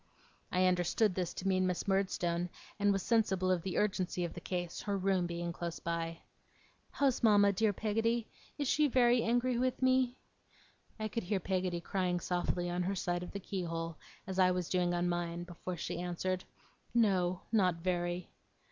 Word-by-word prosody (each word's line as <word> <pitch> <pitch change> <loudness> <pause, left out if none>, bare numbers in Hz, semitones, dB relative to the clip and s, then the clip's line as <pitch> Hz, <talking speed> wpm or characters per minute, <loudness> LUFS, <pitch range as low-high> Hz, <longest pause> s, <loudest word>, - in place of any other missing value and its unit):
I 185 0 +3
understood 180 +3 +2
this 180 -2 -2
to 195 - -3
mean 185 -1 +3
Miss 180 +1 -2
Murdstone, 180 -3 0 0.3
and 205 0 +4
was 195 -2 0
sensible 190 -5 +2
of 180 -2 +2
the 185 +1 -3
urgency 185 -3 0
of 170 - -5
the 175 - -8
case; 175 -1 -3
her 200 -1 -1
room 190 -2 +1
being 170 0 -3
close 170 -1 -4
by. 165 0 -3 0.7
'How's 275 -3 +1
mama, 205 -3 +5
dear 215 +2 +2
Peggotty? 225 +3 0 0.3
Is 285 -2 -1
she 300 +3 +4
very 245 -2 +4
angry 240 +1 +1
with 255 0 0
me?' 260 -1 +3 0.8
I 215 - -1
could 230 +2 -3
hear 195 +1 -1
Peggotty 185 -1 -1
crying 180 -1 0
softly 175 0 -1
on 175 +1 -1
her 190 +2 -1
side 175 -1 -1
of 180 - -6
the 200 - -4
keyhole, 165 -4 -3 0.3
as 190 0 -3
I 185 -1 +6
was 180 -2 -1
doing 180 -1 +2
on 175 0 +1
mine, 175 0 -2
before 175 +1 -6
she 165 - -4
answered. 180 +1 -2 0.5
'No. 185 -6 +3
Not 190 -6 +3
very. 175 0 -2
185 Hz, 175 wpm, -33 LUFS, 175-205 Hz, 0.8 s, I